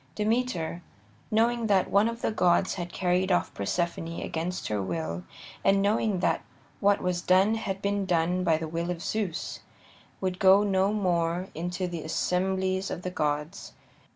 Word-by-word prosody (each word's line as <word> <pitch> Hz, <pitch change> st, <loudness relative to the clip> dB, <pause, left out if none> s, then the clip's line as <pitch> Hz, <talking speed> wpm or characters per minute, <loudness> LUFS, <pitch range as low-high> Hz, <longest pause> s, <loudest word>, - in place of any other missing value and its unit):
Demeter, 210 Hz, -7 st, -1 dB, 0.5 s
knowing 230 Hz, +1 st, +2 dB
that 195 Hz, -3 st, +2 dB
one 200 Hz, +2 st, +4 dB
of 230 Hz, 0 st, -7 dB
the -, -, +1 dB
gods 185 Hz, -2 st, +2 dB
had 175 Hz, -2 st, -5 dB
carried 185 Hz, +1 st, +1 dB
off 175 Hz, -, +1 dB
Persephone 165 Hz, -, -2 dB
against 170 Hz, +3 st, -3 dB
her 105 Hz, -1 st, -1 dB
will, 85 Hz, -2 st, -3 dB, 0.4 s
and 195 Hz, 0 st, +4 dB
knowing 205 Hz, -1 st, +1 dB
that -, -, +1 dB, 0.4 s
what 200 Hz, 0 st, +3 dB
was 180 Hz, -1 st, 0 dB
done 190 Hz, +4 st, +4 dB
had 200 Hz, -3 st, -3 dB
been 200 Hz, -1 st, 0 dB
done 175 Hz, +1 st, +1 dB
by 165 Hz, -3 st, +3 dB
the 160 Hz, 0 st, -4 dB
will 165 Hz, +2 st, -3 dB
of 175 Hz, -1 st, -3 dB
Zeus, 205 Hz, -6 st, -3 dB, 0.6 s
would 185 Hz, -1 st, -2 dB
go 195 Hz, +1 st, +6 dB
no 195 Hz, -1 st, +2 dB
more 180 Hz, -3 st, 0 dB
into 180 Hz, +2 st, -3 dB
the 170 Hz, -2 st, -5 dB
assemblies 190 Hz, +3 st, 0 dB
of 175 Hz, -, -5 dB
the 185 Hz, -, -3 dB
gods. 150 Hz, +3 st, -2 dB
185 Hz, 160 wpm, -28 LUFS, 170-200 Hz, 0.6 s, go